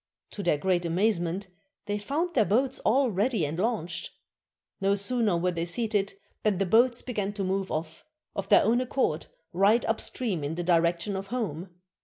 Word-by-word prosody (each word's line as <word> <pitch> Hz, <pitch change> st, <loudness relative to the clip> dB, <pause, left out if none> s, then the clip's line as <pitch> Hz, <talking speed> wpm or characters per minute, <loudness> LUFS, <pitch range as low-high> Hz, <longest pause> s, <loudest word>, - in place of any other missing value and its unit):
To 205 Hz, -, -6 dB
their 170 Hz, -5 st, +2 dB
great 180 Hz, +2 st, +1 dB
amazement, 180 Hz, +1 st, 0 dB, 0.4 s
they 205 Hz, 0 st, -2 dB
found 315 Hz, -, -2 dB
their 235 Hz, -, +4 dB
boats 255 Hz, +6 st, +1 dB
all 255 Hz, +2 st, +2 dB
ready 205 Hz, -2 st, +1 dB
and 155 Hz, +4 st, -4 dB
launched! 180 Hz, -6 st, -1 dB, 0.7 s
No 195 Hz, +1 st, +3 dB
sooner 210 Hz, -2 st, +1 dB
were 180 Hz, +2 st, +1 dB
they 170 Hz, -1 st, -2 dB
seated 205 Hz, +2 st, -1 dB, 0.3 s
than 210 Hz, -3 st, +1 dB
the 195 Hz, -, +1 dB
boats 235 Hz, +5 st, +3 dB
began 205 Hz, -5 st, -2 dB
to 200 Hz, -1 st, -3 dB
move 190 Hz, 0 st, -1 dB
off, 160 Hz, +1 st, -4 dB, 0.3 s
of -, -, -4 dB
their -, -, +7 dB
own 240 Hz, +3 st, +3 dB
accord, 250 Hz, -, -1 dB, 0.3 s
right 200 Hz, +6 st, +4 dB
upstream 220 Hz, -, -2 dB
in 145 Hz, +3 st, -3 dB
the 175 Hz, -, -3 dB
direction 170 Hz, +3 st, +2 dB
of 195 Hz, +1 st, -4 dB
home. 195 Hz, -7 st, -3 dB
195 Hz, 175 wpm, -28 LUFS, 175-225 Hz, 0.7 s, their